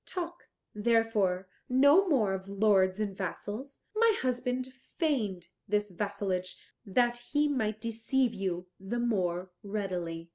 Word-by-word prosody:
Talk, 345 -1 -5 0.3
therefore, 210 -4 +2 0.2
no 285 +9 +6
more 220 - +3
of 190 0 -5
lords 200 -1 +3
and 205 -3 -2
vassals. 210 +7 -5
My 455 0 +4
husband 255 0 -1 0.2
feigned 210 - 0 0.2
this 210 0 0
vassalage 185 -1 -2 0.3
that 240 +3 +2
he 290 +5 0
might 220 -7 -1
deceive 230 +3 0
you 185 -3 -2
the 195 +5 -3
more 185 -6 0
readily." 180 -5 -4
215 Hz, 120 wpm, -30 LUFS, 190-250 Hz, 0.3 s, no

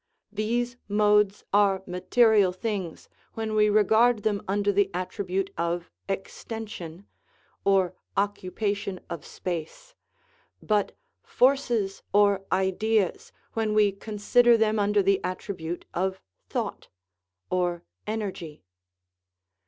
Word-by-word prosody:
These 235 +3 -1
modes 210 -1 +3
are 200 -2 +3
material 195 +2 +3
things 185 -3 -4 0.3
when 220 -1 -3
we 210 0 +4
regard 220 +2 +4
them 205 -2 0
under 205 +1 +1
the 200 0 +2
attribute 190 +1 -2
of 170 +1 -2 0.2
extension 195 -2 -6 0.6
(or 190 -2 +3 0.2
"occupation 200 0 -1
of 170 -4 -5
space 180 - -6 0.3
"), - - -36 0.3
but 210 -2 0 0.2
forces 240 -7 +1
or 200 -1 +4
ideas 190 +1 +1 0.2
when 220 -1 0
we 210 -1 +5
consider 220 +4 +3
them 220 -1 +2
under 205 0 +2
the 195 0 +2
at 185 0 -2
tribute 175 -3 -6
of 190 +1 -1 0.3
thought - - -3 0.6
(or 175 -1 0
" - - -47
energy 175 - -6
200 Hz, 110 wpm, -26 LUFS, 185-215 Hz, 0.6 s, we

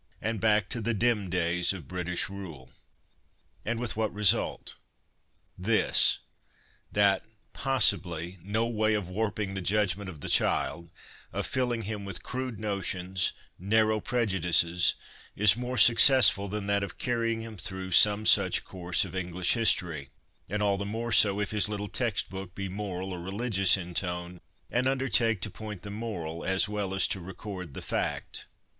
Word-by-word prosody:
and 110 -1 -3
back 105 -3 +2
to 115 - -2
the 115 +1 -1
dim 105 -3 0
days 90 +1 0
of 85 -8 -10
British 90 -1 -3
rule. 85 -10 -10 0.9
And 115 +1 -3
with 120 -2 -3
what 110 -1 -1
result? 105 -2 +1 0.8
This: 110 +4 +3 0.7
that, 100 -1 +3 0.3
possibly, 90 - 0
no 105 +6 -1
way 110 -2 0
of 100 -4 -4
warping 105 0 -3
the 95 - -4
judgment 100 0 0
of 80 -6 -11
the - - -6
child, 85 0 +1 0.4
of - - -3
filling 120 -3 -1
him 105 0 -5
with 100 -3 -5
crude 130 -3 -5
notions, 95 -3 -2 0.3
narrow 110 +3 +1
prejudices, 90 -7 +3 0.4
is 105 +1 +5
more 125 +1 -5
successful 115 -6 +7
than 105 +1 -5
that 100 0 +1
of 100 - -7
carrying 115 -2 -1
him 115 -1 -8
through 95 +1 -6
some 105 +4 +6
such - - +3
course 90 0 -1
of 90 - -10
English 90 -1 0
history; 85 - 0 0.4
and 105 +2 -2
all 100 -1 +1
the - - -3
more 115 +3 -4
so 100 -2 +5
if 105 - -2
his 105 -1 +2
little 105 -1 -4
text 115 -1 -1
book 95 -2 -8
be 100 0 -4
moral 95 -1 -5
or 90 - -6
religious 95 0 +2
in 90 -1 -8
tone, 90 0 -4 0.3
and 125 +2 0
undertake 130 -5 +1
to - - -3
point 105 -4 -9
the 100 - -8
moral 90 -7 -6
as 95 +3 +2
well 105 -2 -3
as 95 - +4
to 95 - -1
record 90 -3 -9
the - - -7
fact. - - -3
100 Hz, 160 wpm, -28 LUFS, 90-110 Hz, 0.9 s, successful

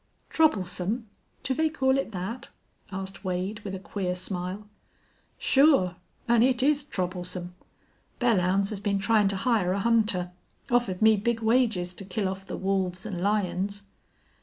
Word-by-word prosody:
"Troublesome! 215 - +1 0.4
Do 260 - 0
they 315 +4 +1
call 265 -4 +2
it 275 -4 -1
that?" 195 +6 -5 0.4
asked 190 +1 -6
Wade, 185 +3 -2
with 195 -3 -6
a - - -6
queer 180 0 -3
smile. 185 +2 -4 0.7
"Sure. 270 - +4 0.3
An' 235 -1 +4
it 255 0 +3
is 290 +1 +3
troublesome. 180 -5 -4 0.7
Belllounds 195 -4 +2
has 210 - -4
been 200 -1 0
tryin' 210 +1 +3
to 195 - 0
hire 195 -3 +1
a 200 - -1
hunter. 210 -5 +2 0.4
Offered 230 -5 +1
me 220 -1 +6
big 230 +2 -1
wages 220 -6 +2
to 195 - -8
kill 195 +1 -2
off 190 0 -5
the - - -5
wolves 190 -1 -1
an' 190 -5 -4
lions." 200 0 0
200 Hz, 150 wpm, -27 LUFS, 185-230 Hz, 0.7 s, me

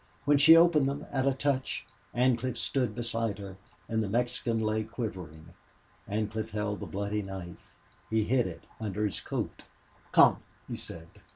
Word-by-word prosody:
When 145 0 +5
she 160 +3 +9
opened 160 -5 +5
them, 140 +2 -4
at 135 -1 +1
a - - +5
touch, 135 -1 -1 0.3
Ancliffe 125 0 +2
stood 125 -6 -1
beside 115 -3 -2
her 100 -2 -8 0.3
and 110 -1 0
the 105 - -2
Mexican 120 0 0
lay 110 0 0
quivering. 95 -9 -6 0.6
Ancliffe 110 +1 -2
held 105 -1 -2
the - - -6
bloody 100 +2 -2
knife; 95 -3 -8 0.4
he 110 -1 +2
hid 125 0 +2
it 85 - -8 0.2
under 105 -1 -2
his 100 - -3
coat. - - -4 0.5
"Come," - - +6 0.3
he - - -4
said. 80 -1 -5
110 Hz, 160 wpm, -30 LUFS, 100-130 Hz, 0.6 s, she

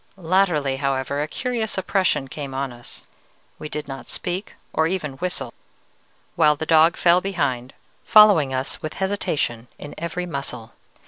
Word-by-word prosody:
Latterly, 165 -6 +1
however, 140 +1 -1
a 150 - -1
curious 230 - -3
oppression 185 -6 +1
came 135 -1 -6
on 135 -2 -2
us; 120 0 -10 0.5
we 150 - -6
did 150 -1 -5
not 135 -3 -7
speak 185 +2 -4 0.2
or 160 0 +2
even 165 -5 -2
whistle, 180 0 -3 0.8
while 150 -2 +4
the 160 - -4
dog 160 +1 +5
fell 175 +1 +4
behind, 140 -10 -2 0.3
following 205 -10 +6
us 130 +1 -3
with 155 - -5
hesitation 155 - -1
in 145 - -9
every 170 +2 -3
muscle. 130 -7 -5
155 Hz, 145 wpm, -23 LUFS, 135-180 Hz, 0.8 s, following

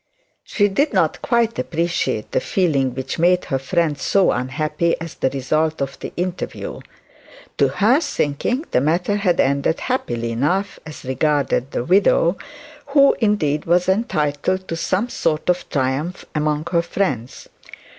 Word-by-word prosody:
She 205 - +1
did 280 +10 0
not - - +1
quite 235 -1 +1
appreciate 170 +1 -1
the - - +2
feeling 155 - 0
which 130 +2 -4
made 180 +2 +3
her 135 - -1
friend 155 +1 0
so 195 -2 +3
unhappy 155 +6 -1
at 165 0 -8
the 130 - +3
result 155 +4 -1
of 140 0 -4
the - - -6
interview. 180 0 -4 0.8
To - - +5
her 240 +9 +3
thinking, 245 - -1
the 125 - +3
matter 175 +7 +1
had 185 -4 +1
ended 140 +4 +1
happily 120 - -2
enough 180 - -1
as 150 -2 -10
regarded 135 -1 0
the 120 - -2
widow, 185 -1 +3 0.5
who 280 0 +5
indeed 165 - +1
was 175 +2 +2
entitled 185 - 0
to 165 - -2
some 185 +6 0
sort 165 -7 0
of 180 - -4
triumph 140 +6 -2
among 150 +1 -1
her 170 -2 +3
friends. 140 - -3
165 Hz, 145 wpm, -20 LUFS, 140-195 Hz, 0.8 s, To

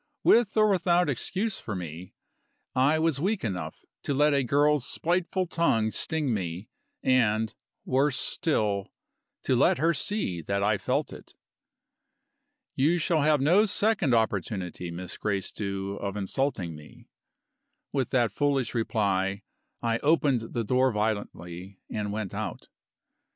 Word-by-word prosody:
With 225 -2 +4
or 215 0 +6
without 180 -4 +2
excuse 195 - -2
for 110 - -5
me, 90 0 -7 0.6
I 135 +5 +4
was 160 -3 +1
weak 195 +6 0
enough 90 -8 -4 0.2
to 140 - -2
let 150 +1 +4
a 140 -1 +2
girl's 145 +2 +3
spiteful 180 +4 -1
tongue 115 -11 +1
sting 155 -3 -1
me, 90 0 -4 0.3
and, 110 -4 +2 0.3
worse 135 +1 +2
still, 105 -10 0 0.6
to - - +2
let - - +4
her 165 +5 +2
see 150 - -1
that 100 +5 -1
I 105 0 +2
felt - - -1
it. - - -13 1.4
"You 155 +6 +2
shall 165 -1 +1
have 150 -1 +3
no 185 +10 +4
second 195 - +2
opportunity, 95 -5 -1
Miss 90 +1 -6
Gracedieu, 100 -1 -3
of 100 0 -4
insulting 100 - -2
me." 75 -1 -15 0.9
With 135 -3 0
that 120 -4 +2
foolish 140 -1 0
reply, 100 -4 0 0.4
I 115 -1 +1
opened 140 -7 +1
the 115 - 0
door 130 +4 +2
violently 100 -4 -3
and 105 -1 -2
went 105 -2 -4
out. - - -5
120 Hz, 135 wpm, -27 LUFS, 100-150 Hz, 1.4 s, or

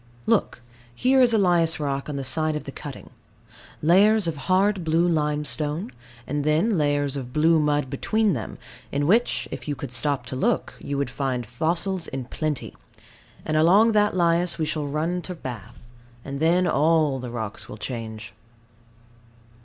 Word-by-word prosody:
Look. 120 - 0 0.3
Here 260 - +3
is 245 -2 +5
lias 175 -7 +3
rock 140 -1 -2
in 145 - -4
the 140 - -3
side 155 +4 0
of 150 - -4
the 140 - -7
cutting; 140 0 -9 0.7
layers 200 +6 +5
of 165 - -1
hard 185 +6 +1
blue 165 +2 +2
limestone, 150 0 -1 0.3
and 145 +1 -2
then 155 +9 +2
layers 145 -3 +1
of 130 -3 -5
blue 160 +3 +3
mud 145 -2 +1
between 215 +8 +1
them, 115 -6 -5 0.3
in 145 +1 0
which, 225 +9 +2
if - - -7
you 145 - -1
could 130 -1 -7
stop 135 0 0
to 130 - -6
look, 130 - 0
you 140 - -4
would 140 - -2
find 130 -3 -2
fossils 165 - -2
in 130 -1 -5
plenty; 150 +2 -4 0.7
and 155 - 0
along 195 +9 +5
that 210 -3 +2
lias 170 0 +2
we 160 - 0
shall 155 -1 -2
run 160 +5 -1
to 180 +1 -6
Bath, 120 - -9 0.4
and 140 0 -5
then 170 +4 +3
all 155 -3 +2
the 125 -1 -6
rocks 110 -3 -6
will 105 - -8
change. 110 -1 -6
150 Hz, 165 wpm, -24 LUFS, 140-175 Hz, 0.7 s, is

